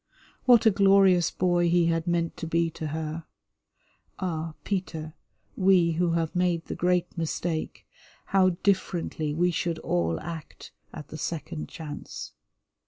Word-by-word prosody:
What 240 -2 +6
a 220 - +7
glorious 195 -3 +5
boy 175 -1 +1
he 175 0 +4
had 165 0 0
meant 170 -1 0
to 165 - -5
be 165 0 +1
to 155 - -5
her. 160 +1 -4 0.9
Ah, 165 -3 -3
Peter, 160 -5 -3 0.4
we 185 -3 +4
who 170 +1 +1
have 165 0 -1
made 180 -2 +1
the - - -5
great 180 0 0
mistake, 165 -1 -3 0.4
how 190 -1 +4
differently 175 -5 0
we 175 +4 +2
should 170 0 -1
all 85 - -1
act 165 -2 -8 0.2
at 150 -2 -9
the 155 - -8
second 160 0 -4
chance. 150 -3 -8
170 Hz, 140 wpm, -27 LUFS, 160-180 Hz, 0.9 s, a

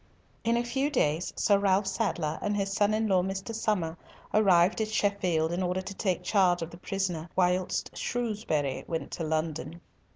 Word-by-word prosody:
In 230 +1 +2
a 240 - +1
few 265 +4 0
days, 160 - +1
Sir 200 -1 +3
Ralf 195 0 +2
Sadler 190 -6 -1
and 205 0 0
his 195 -1 -1
son 205 +1 +3
in 220 0 0
law 190 -3 +3
Mr. 195 +4 -4
Somer 205 -7 -1 0.4
arrived 190 -1 +4
at 220 - 0
Sheffield 190 -7 +1
in 175 +2 -1
order 185 +1 -1
to 195 - -6
take 185 -2 -1
the - - -19
charge 180 -4 +3
of 165 - -7
the 170 - -10
prisoner 180 -3 -3
whilst 180 0 0
Shrewsbury 210 - -2
went 165 -2 -3
to 165 - -4
London. 160 +1 -2
190 Hz, 185 wpm, -29 LUFS, 170-205 Hz, 0.4 s, arrived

